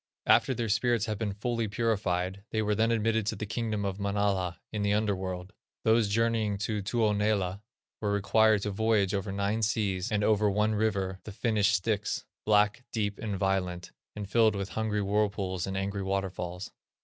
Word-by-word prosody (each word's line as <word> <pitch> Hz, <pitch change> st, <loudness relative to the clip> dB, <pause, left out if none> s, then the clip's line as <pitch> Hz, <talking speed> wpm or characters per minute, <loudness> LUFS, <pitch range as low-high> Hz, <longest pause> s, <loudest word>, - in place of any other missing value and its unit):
After 130 Hz, -, +4 dB
their 115 Hz, 0 st, -2 dB
spirits 115 Hz, +1 st, +1 dB
had 110 Hz, -2 st, -3 dB
been 105 Hz, -3 st, -2 dB
fully 115 Hz, +1 st, -1 dB
purified, 100 Hz, -3 st, -1 dB
they 110 Hz, -1 st, 0 dB
were 105 Hz, 0 st, +1 dB
then 110 Hz, +2 st, +2 dB
admitted 110 Hz, -1 st, +1 dB
to -, -, 0 dB
the 105 Hz, -, -4 dB
Kingdom 110 Hz, -1 st, -2 dB
of 100 Hz, 0 st, -3 dB
Manala 100 Hz, -3 st, 0 dB
in 105 Hz, -, -3 dB
the 100 Hz, 0 st, +2 dB
under 105 Hz, -1 st, +1 dB
world. 95 Hz, +1 st, -5 dB, 0.3 s
Those 110 Hz, -1 st, +3 dB
journeying 110 Hz, -1 st, +1 dB
to 105 Hz, +1 st, -2 dB
Tuonela 105 Hz, -3 st, 0 dB, 0.4 s
were 105 Hz, -2 st, -1 dB
required 105 Hz, +1 st, +3 dB
to 105 Hz, -, -1 dB
voyage 105 Hz, -1 st, +2 dB
over 100 Hz, 0 st, -2 dB
nine 100 Hz, +3 st, -1 dB
seas, 105 Hz, -1 st, 0 dB
and 105 Hz, -1 st, +1 dB
over 105 Hz, 0 st, +3 dB
one 105 Hz, +2 st, +1 dB
river, 100 Hz, -3 st, 0 dB
the 110 Hz, -, -8 dB
Finnish 105 Hz, -1 st, +1 dB
Styx, 105 Hz, +2 st, -1 dB, 0.2 s
black, 105 Hz, +3 st, +3 dB
deep, 105 Hz, -3 st, -2 dB
and 105 Hz, -3 st, -3 dB
violent, 90 Hz, -2 st, -1 dB, 0.2 s
and 105 Hz, -2 st, -5 dB
filled 110 Hz, 0 st, +3 dB
with 100 Hz, 0 st, -3 dB
hungry 105 Hz, -2 st, -1 dB
whirlpools, 100 Hz, -2 st, 0 dB
and 95 Hz, 0 st, -3 dB
angry 100 Hz, +1 st, -2 dB
waterfalls. 95 Hz, -2 st, -3 dB
105 Hz, 175 wpm, -29 LUFS, 95-110 Hz, 0.4 s, After